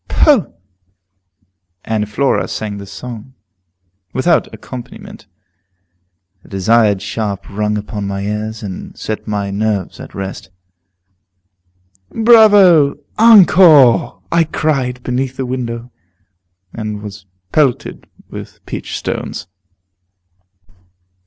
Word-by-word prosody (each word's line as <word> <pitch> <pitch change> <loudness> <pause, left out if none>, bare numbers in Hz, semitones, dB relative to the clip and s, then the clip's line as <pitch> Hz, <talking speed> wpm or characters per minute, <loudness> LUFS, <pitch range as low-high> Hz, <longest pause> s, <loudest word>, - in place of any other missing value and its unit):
"Poh!" 270 - +3 1.3
And 105 -2 -2
Flora 135 +6 0
sang 105 -2 -5
the 100 - -9
song, 115 +5 -9 0.8
without 160 +5 +1
accompaniment. 200 - -10 1.1
The - - -20
desired 100 +1 +2
sharp 100 -3 -4
rung 105 +1 -2
upon 105 -1 -5
my 100 0 -3
ears, 105 +2 -4
and 95 -3 -8
set 110 - -5
my 100 -2 -2
nerves 100 -2 -2
at - - -11
rest. 95 -1 -6 1.6
"Bravo! 205 -11 +5 0.2
Encore!" 180 - +6
I 170 0 +4
cried, 135 -6 -2
beneath 130 +1 -2
the 130 - -2
window, 120 -1 -5 0.8
and 105 -2 -5
was 100 -1 -10 0.2
pelted 140 -5 0 0.2
with - - -11
peach - - -5
stones. - - -5
115 Hz, 95 wpm, -16 LUFS, 105-145 Hz, 1.6 s, Encore